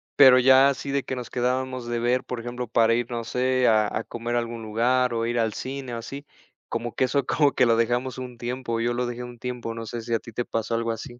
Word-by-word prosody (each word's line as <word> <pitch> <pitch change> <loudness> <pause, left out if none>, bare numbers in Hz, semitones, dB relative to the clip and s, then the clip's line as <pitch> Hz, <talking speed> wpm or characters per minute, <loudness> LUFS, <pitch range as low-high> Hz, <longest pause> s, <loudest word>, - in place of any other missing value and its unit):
Pero 130 -2 +8
ya 130 +2 +6
así 140 0 -3
de 140 -1 0
que 130 - -4
nos 125 -1 -6
quedábamos 125 0 -1
de 120 0 -1
ver, 125 +2 +1
por 125 - -4
ejemplo, 120 +1 -5
para 115 0 +3
ir, 120 +1 -1
no 115 -1 -3
sé, 130 +1 +1
a 110 -2 +4
a 110 - -3
comer 120 +1 -4
a - - +3
algún 115 -1 -5
lugar, 120 +3 +1
o 115 0 -1
ir 120 +1 0
al 110 -2 +1
cine 130 -2 -5
o 115 - -3
así. 140 +5 -7 0.4
Como 120 -1 -3
que 130 - +2
eso 135 +1 0
como 145 -1 +2
que - - +4
lo 115 -1 +4
dejamos 120 +3 0
un 125 -2 -7
tiempo, 120 -1 -3
yo 120 +1 0
lo 125 +1 -1
dejé 120 0 -5
un 120 -1 -10
tiempo, 120 -2 -4
no 115 0 -6
sé 120 +1 -5
si 115 +1 -4
a 115 - +2
ti 115 - -12
te 120 +2 -3
pasó 115 +1 -2
algo 115 0 -1
así. 120 +2 -7
120 Hz, 270 wpm, -25 LUFS, 115-130 Hz, 0.4 s, Pero